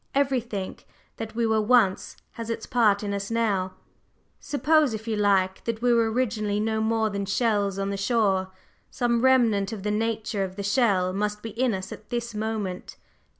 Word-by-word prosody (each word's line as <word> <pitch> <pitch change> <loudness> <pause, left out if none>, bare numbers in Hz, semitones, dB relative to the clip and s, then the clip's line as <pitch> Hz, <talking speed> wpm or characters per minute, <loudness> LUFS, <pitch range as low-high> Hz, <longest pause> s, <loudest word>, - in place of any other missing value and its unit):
Everything 245 -8 -1 0.4
that 225 -1 -6
we 235 0 +1
were 220 -1 +2
once 215 -4 +2
has 230 -1 -7
its 230 - -3
part 215 -5 +2
in 200 -1 -2
us 200 0 -3
now. 200 -5 0 0.6
Suppose, 295 -2 +2
if 220 +1 -8
you 225 - 0
like, 195 -2 +2
that 230 0 -3
we 245 -1 +4
were 230 -1 +2
originally 215 -4 0
no 220 +1 0
more 220 -1 +1
than 200 -1 -3
shells 205 -2 +1
on 195 0 -2
the 200 - -3
shore, 200 -3 +1 0.4
some 235 -1 0
remnant 235 -6 +3
of 210 -4 -6
the 210 - 0
nature 220 -1 -1
of 190 -1 -5
the 200 - -5
shell 200 -4 +2
must 210 +1 -2
be 225 - -5
in 235 0 0
us 185 0 -6
at 215 - -10
this 235 -1 -3
moment. 210 -4 -4
220 Hz, 185 wpm, -25 LUFS, 200-230 Hz, 0.6 s, we